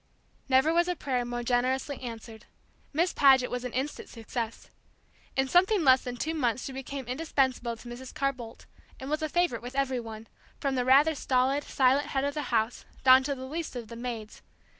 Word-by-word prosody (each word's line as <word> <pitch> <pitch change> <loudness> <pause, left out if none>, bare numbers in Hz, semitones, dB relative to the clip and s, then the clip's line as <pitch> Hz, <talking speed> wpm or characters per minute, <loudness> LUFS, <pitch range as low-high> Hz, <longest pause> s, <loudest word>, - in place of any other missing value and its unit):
Never 265 +5 +4
was 345 +1 +3
a 360 - 0
prayer 260 -5 -1
more 240 0 -4
generously 255 +3 0
answered. 230 -2 -8 0.5
Miss 340 +4 +1
Paget 265 -3 +5
was 250 0 -3
an 250 - -4
instant 265 +5 -4
success. 230 0 -6 0.6
In 265 0 +1
something 370 +5 +3
less 260 -2 +6
than 245 -1 -6
two 315 +6 -2
months 250 -6 -1
she - - -5
became 270 0 -6
indispensable 255 -3 -1
to 240 - -13
Mrs. 245 +2 -8
Carr 275 -2 0
Boldt, 235 -3 -11 0.3
and 265 +2 -6
was 305 +1 0
a 310 - -1
favorite 345 -8 +1
with 245 +2 -8
every 270 -2 0
one, 225 -1 -8 0.3
from 275 -1 -1
the 250 -1 0
rather 280 +5 +5
stolid, 270 0 +1
silent 270 +2 +2
head 270 -2 -1
of 285 0 -1
the 300 - -2
house 225 0 0 0.2
down 260 0 +8
to 280 +1 -2
the 260 0 -7
least 315 +1 -5
of 235 -3 -6
the 230 - -8
maids. 230 -3 -6
260 Hz, 200 wpm, -28 LUFS, 245-285 Hz, 0.6 s, down